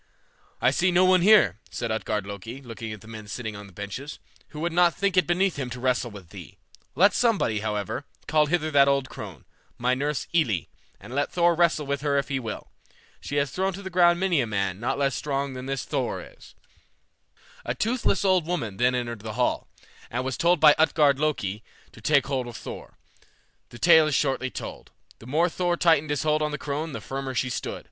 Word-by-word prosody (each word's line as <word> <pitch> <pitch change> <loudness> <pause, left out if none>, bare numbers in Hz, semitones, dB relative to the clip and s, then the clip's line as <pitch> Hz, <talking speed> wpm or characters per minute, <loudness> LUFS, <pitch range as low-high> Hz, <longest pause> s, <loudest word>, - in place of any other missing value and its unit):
"I 125 - +3
see 180 +7 +2
no 180 +1 +4
one 185 -1 +5
here," 180 - +5
said 115 -2 -4
Utgard 105 -2 -2
Loki, 100 +5 -7
looking 115 -4 -7
at 105 -2 -8
the 110 - -14
men 110 -2 -9
sitting 110 0 -5
on 100 0 -9
the - - -16
benches, 100 +10 -7 0.3
"who 150 - -10
would 170 0 -1
not 175 -1 +4
think 200 -1 0
it 185 - +3
beneath 180 0 +1
him 130 -3 -3
to 125 +1 -7
wrestle 125 -1 0
with 100 -6 -12
thee; 90 -7 -11 0.4
let 195 +7 +5
somebody, 215 - +1
however, 105 -2 -3 0.2
call 150 -1 +3
hither 155 0 0
that 140 -1 +5
old 140 -2 +1
crone, - - -9 0.3
my 125 +1 +1
nurse 145 +2 -1
Elli, 115 - +1 0.3
and 105 +5 -11
let 145 +1 0
Thor 175 -1 +3
wrestle 170 -3 +2
with 140 0 -2
her 145 -1 +1
if 140 - -1
he 135 -2 -1
will. 115 -4 -7 0.5
She 145 - -6
has 140 -2 +1
thrown 190 +1 -1
to 200 +2 -8
the 190 - -6
ground 175 -1 +4
many 180 -6 +2
a 120 - -2
man 100 -3 -2
not 120 - -1
less 140 -1 +1
strong 140 +1 -2
than 130 0 -7
this 135 -2 -3
Thor - - -2
is." - - -14 1.1
A 120 - -3
toothless 225 - 0
old 185 -4 +3
woman 115 - -3
then 125 +1 +2
entered 120 -2 -3
the 110 +1 -7
hall, 125 +2 0 0.4
and 125 +2 -2
was 130 -2 -2
told 170 +4 +3
by 150 -1 +8
Utgard 150 -3 +4
Loki 110 -10 -1 0.3
to 120 - -15
take 140 +2 +3
hold 130 -3 -2
of 120 - -8
Thor. - - -9 0.7
The 120 - -11
tale 160 +1 +6
is 150 - 0
shortly 135 -2 0
told. - - -8 0.3
The 115 - -13
more 160 +6 +2
Thor 175 0 -1
tightened 160 -4 +3
his 145 0 -1
hold 155 0 +1
on 150 - +1
the 150 - -4
crone 150 +2 -4
the - - -5
firmer 135 -1 -5
she 125 +1 0
stood. - - -4
140 Hz, 215 wpm, -25 LUFS, 120-165 Hz, 1.1 s, by